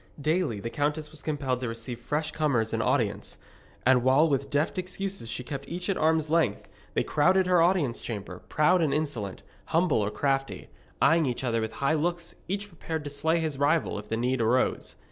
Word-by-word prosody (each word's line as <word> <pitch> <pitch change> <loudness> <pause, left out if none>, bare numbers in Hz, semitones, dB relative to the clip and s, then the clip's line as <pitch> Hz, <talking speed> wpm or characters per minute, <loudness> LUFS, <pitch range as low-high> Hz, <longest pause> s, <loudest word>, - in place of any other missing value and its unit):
Daily 150 - 0
the 115 +4 -5
countess 150 +3 -1
was 155 -2 -11
compelled 140 -5 -1
to 125 - -3
receive 115 +1 -6
fresh 150 +6 -2
comers 130 -9 0
in - - +1
audience, - - 0 0.5
and 130 0 +5
while 135 +6 +5
with 140 -2 0
deft 150 +6 0
excuses 185 -7 -5
she 125 - -4
kept 140 +2 -6
each 180 +3 -4
at - - 0
arm's 160 0 +2
length, 155 -10 +1 0.3
they - - +2
crowded 185 +5 +3
her 180 -2 +4
audience 165 -8 +2
chamber, 100 -5 -6
proud 175 +4 +3
and 155 -4 +2
insolent, 125 -11 -3 0.2
humble 165 -5 +2
or 105 -1 0
crafty, 135 +3 -1 0.3
eyeing 165 -2 +4
each 125 +1 -2
other 115 -3 +1
with 110 0 -3
high 140 +3 +1
looks, 170 +2 -1
each 200 +2 -2
prepared 160 -4 -5
to 145 - -6
slay 160 +4 +1
his 155 -4 -2
rival 145 -6 +2
if 105 - -10
the 115 - -1
need 125 +1 0
arose. 120 +3 +1
145 Hz, 195 wpm, -28 LUFS, 125-165 Hz, 0.5 s, and